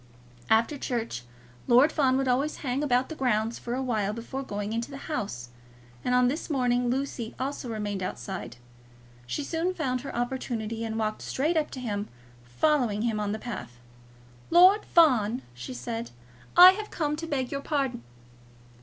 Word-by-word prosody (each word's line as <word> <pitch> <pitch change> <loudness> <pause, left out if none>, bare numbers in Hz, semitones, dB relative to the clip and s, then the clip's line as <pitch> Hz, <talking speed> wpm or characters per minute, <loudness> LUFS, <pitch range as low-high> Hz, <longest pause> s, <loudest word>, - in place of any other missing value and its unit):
After 230 +6 +3
church, 230 - -3 0.4
Lord 255 +6 +6
Fawn 265 -5 +2
would 270 0 0
always 270 +5 +1
hang 255 +2 0
about 255 -3 +2
the - - -4
grounds 230 -4 0
for 240 +1 -4
awhile 225 -6 -1
before 235 +4 -5
going 205 -4 -4
into 230 +2 -2
the 275 - -7
house; 120 - -4 0.5
and 250 - +1
on 250 0 +5
this 290 +7 -2
morning 245 -3 +1
Lucy 255 -3 -3
also 265 -1 -3
remained 205 -3 -3
outside. 185 -2 -5 0.7
She 285 - -2
soon 335 +5 -1
found 255 -7 -1
her 275 - -7
opportunity, 235 -2 -3
and 225 -1 -3
walked 215 -1 -2
straight 305 +6 0
up 310 -2 +1
to 260 - -7
him, 210 -4 -3 0.4
following 220 - +1
him 225 -2 0
on 205 -1 -1
the 215 - -2
path. 120 - -7 0.7
"Lord 370 +5 +6
Fawn," 255 -7 +4
she 125 +1 -7
said, 115 -1 -4 0.5
"I 360 +1 +12
have 425 +2 -5
come 300 -2 -1
to 330 +1 -5
beg 265 -5 -2
your 280 - -2
pardon." 275 - -1
245 Hz, 165 wpm, -27 LUFS, 215-280 Hz, 0.7 s, I